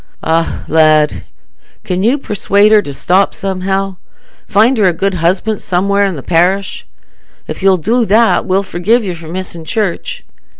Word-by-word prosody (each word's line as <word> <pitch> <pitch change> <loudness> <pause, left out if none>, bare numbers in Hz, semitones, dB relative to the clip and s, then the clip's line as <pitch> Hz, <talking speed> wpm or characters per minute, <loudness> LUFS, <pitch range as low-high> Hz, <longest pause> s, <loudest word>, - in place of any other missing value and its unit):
"Ah, 165 +1 -1
lad! 155 -1 +2 0.6
Can 180 0 -2
you 235 +8 +2
persuade 210 -4 +1
her 215 -1 +6
to 145 - -7
stop 185 +7 +1
somehow? 195 -1 -3 0.5
Find 225 +6 +3
her 205 - +3
a 180 - +3
good 195 +4 -1
husband 185 +5 -1
somewhere 200 +3 0
i' 195 - -1
the 145 -7 -7
parish. 180 +3 0 0.6
If - - -6
you'll 190 -1 +4
do 230 +8 0
that, 225 +1 +2
we'll 190 +1 +1
forgive 200 +6 0
you 185 -3 -3
for 170 -1 -11
missing 175 -1 -6
church. 200 +1 -3
190 Hz, 160 wpm, -13 LUFS, 175-205 Hz, 0.6 s, her